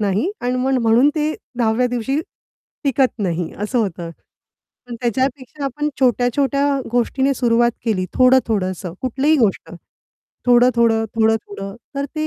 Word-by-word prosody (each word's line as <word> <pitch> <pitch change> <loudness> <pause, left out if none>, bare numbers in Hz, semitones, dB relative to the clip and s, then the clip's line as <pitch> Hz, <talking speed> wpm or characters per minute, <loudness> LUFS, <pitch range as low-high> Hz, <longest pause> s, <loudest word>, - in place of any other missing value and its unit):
नाही 210 - 0
आणि 250 +1 -1
मग 260 +1 +1
म्हणून 230 +5 +4
ते 310 0 0 0.2
10व्या 235 +2 +2
दिवशी 245 +4 -2 0.7
टिकत 270 -1 +2
नाही, 170 -2 -2
असं 210 +5 -2
होतं. 175 -6 -2 0.8
पण 240 - -7
त्याच्यापेक्षा 260 +3 -2
आपण 295 +3 -2
छोट्या-छोट्या 265 +3 +2 0.3
गोष्टीने 265 +3 +1
सुरुवात 235 -1 +2
केली, 190 -6 0
थोडं-थोडंसं 205 -9 +2
कुठलीही 275 +5 +2
गोष्ट. 215 -6 0 0.8
थोडं-थोडं, 235 -2 +4
थोडं-थोडं, 210 -3 -1 0.2
तर 280 0 -2
ते 310 0 -1
245 Hz, 120 wpm, -19 LUFS, 220-265 Hz, 0.8 s, म्हणून